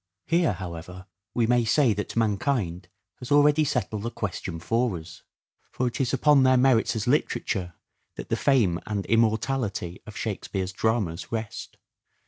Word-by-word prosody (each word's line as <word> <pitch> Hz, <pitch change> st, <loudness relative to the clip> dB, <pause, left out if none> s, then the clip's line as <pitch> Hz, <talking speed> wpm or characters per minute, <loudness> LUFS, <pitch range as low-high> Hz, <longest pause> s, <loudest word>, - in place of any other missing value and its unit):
Here, 170 Hz, -1 st, +2 dB
however, 90 Hz, 0 st, -8 dB, 0.3 s
we 120 Hz, -, +3 dB
may 120 Hz, +1 st, +3 dB
say 120 Hz, +1 st, +3 dB
that 105 Hz, 0 st, -5 dB
mankind 105 Hz, -5 st, 0 dB, 0.3 s
has 125 Hz, -, -9 dB
already 145 Hz, +1 st, +5 dB
settled 120 Hz, -7 st, -1 dB
the 115 Hz, -, -3 dB
question 90 Hz, -6 st, -5 dB
for 115 Hz, +2 st, 0 dB
us. 80 Hz, +1 st, -11 dB, 0.5 s
For 130 Hz, -, -1 dB
it 120 Hz, +2 st, -2 dB
is 125 Hz, -, 0 dB
upon 150 Hz, -2 st, +4 dB
their 130 Hz, 0 st, +5 dB
merits 125 Hz, -3 st, +3 dB
as 110 Hz, -, -2 dB
literature, 95 Hz, -, -1 dB, 0.4 s
that -, -, -8 dB
the -, -, +1 dB
fame 110 Hz, -11 st, +2 dB
and 100 Hz, -2 st, -2 dB
immortality 110 Hz, -4 st, 0 dB
of 105 Hz, -, -9 dB
Shakespeare's 95 Hz, -3 st, -3 dB
dramas 100 Hz, -5 st, -1 dB
rest. 110 Hz, -3 st, -5 dB
110 Hz, 150 wpm, -26 LUFS, 95-125 Hz, 0.5 s, already